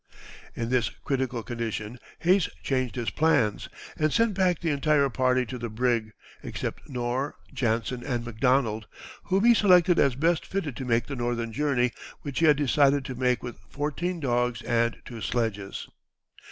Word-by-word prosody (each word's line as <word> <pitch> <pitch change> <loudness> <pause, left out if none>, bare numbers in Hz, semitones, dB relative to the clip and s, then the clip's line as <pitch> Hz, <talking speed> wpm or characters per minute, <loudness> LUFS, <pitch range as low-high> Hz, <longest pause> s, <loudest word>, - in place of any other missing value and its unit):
In 115 0 -3
this 120 -5 +2
critical 125 +3 -3
condition 115 0 -4 0.2
Hayes 180 0 +3
changed 130 -2 -1
his 115 -6 -2
plans, 125 -7 +1 0.3
and 155 0 +1
sent 230 -2 +2
back 185 -2 +2
the 165 -3 0
entire 145 0 +2
party 130 0 +2
to 125 +2 -6
the 120 0 -4
brig, 115 -1 0 0.3
except - - -5
Knorr, 125 +2 -2 0.2
Jansen, 120 -1 -1
and 120 -3 -2
McDonald, 120 -2 +1 0.4
whom 190 +2 +1
he 240 - +8
selected 180 -5 +5
as 135 -4 +3
best 165 +4 +1
fitted 160 -9 -3
to 130 - -4
make 115 -1 +1
the 140 - -5
northern 120 -2 -2
journey, 125 -2 +1 0.3
which 140 -3 -3
he 165 - +4
had 150 -2 +6
decided 145 -1 +3
to 130 - -4
make 125 -1 0
with 120 -5 -7
fourteen 165 +5 -2
dogs 120 -3 0
and 115 0 +1
two 115 -3 -8
sledges. 105 -2 -2
125 Hz, 165 wpm, -27 LUFS, 120-150 Hz, 0.4 s, he